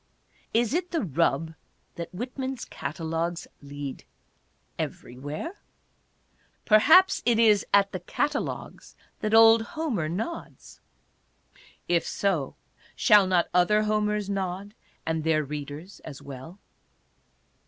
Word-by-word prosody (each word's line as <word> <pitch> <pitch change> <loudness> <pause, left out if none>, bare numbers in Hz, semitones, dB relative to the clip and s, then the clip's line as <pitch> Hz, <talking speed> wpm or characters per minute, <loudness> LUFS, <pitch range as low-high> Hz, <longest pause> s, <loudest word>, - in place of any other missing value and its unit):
Is 230 +1 +1
it 355 +2 -1
the 335 -3 -1
rub 160 -1 0 0.4
that 170 - -7
Whitman's 255 +5 -5
catalogues 165 +1 -4 0.2
lead 140 -1 -7 0.8
everywhere? 145 - -6 1.1
Perhaps 315 - +6
it 235 -1 +3
is 215 -3 +4
at 200 0 +4
the 185 - -4
catalogues 285 - -3 0.2
that 215 +1 +1
old 225 0 +8
Homer 235 - -3
nods. 225 - -6 1.1
If 170 -1 +1
so, 175 -9 -1 0.4
shall 210 -5 +5
not 180 -2 +2
other 180 +4 +4
Homers 210 -1 0
nod 195 0 -3 0.2
— - - -37
and 160 -1 -1
their 155 -1 +2
readers 150 +5 -7
as 140 -3 -10
well 140 +5 -10
195 Hz, 110 wpm, -26 LUFS, 160-225 Hz, 1.1 s, old